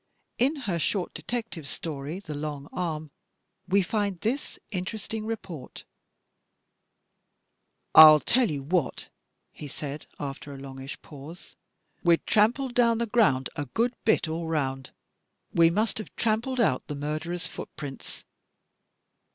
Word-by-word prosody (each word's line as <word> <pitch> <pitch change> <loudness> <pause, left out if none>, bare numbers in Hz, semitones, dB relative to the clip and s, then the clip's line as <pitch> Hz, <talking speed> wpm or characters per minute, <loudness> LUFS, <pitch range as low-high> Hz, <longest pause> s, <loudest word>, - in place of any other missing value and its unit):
In 270 +6 +3
her 175 -4 0
short 185 +2 -1
detective 225 - -5
story, 150 +2 -4
"The 170 -6 -7
Long 145 -1 -4
Arm," 155 -4 -3 0.6
we 195 +1 +4
find 200 -2 -1
this 250 +6 -2
interesting 215 +3 -4
report: 185 - -6 2.1
IITM - - +12
I'll 155 -1 +11
tell 245 - +2
you 140 -2 -3
what," 160 -1 -1 0.4
he 150 - -8
said, 145 +1 -6
after 140 0 -6
a - - -8
longish 135 +1 -8
pause, 155 +5 -11 0.5
"we'd 170 -2 +4
trampled 240 +5 +3
down 235 -2 +4
the 235 - 0
ground 205 - +3
a 145 - -2
good 235 - +1
bit 220 -6 +3
all 165 +1 -3
round; 135 -4 -1 0.6
we 165 -1 +6
must 215 +6 0
have 215 - -8
trampled 230 +4 0
out 130 - +2
the 145 - -4
murderer's 155 +5 -3
footprints." 145 -4 -7
170 Hz, 130 wpm, -27 LUFS, 145-220 Hz, 2.1 s, IITM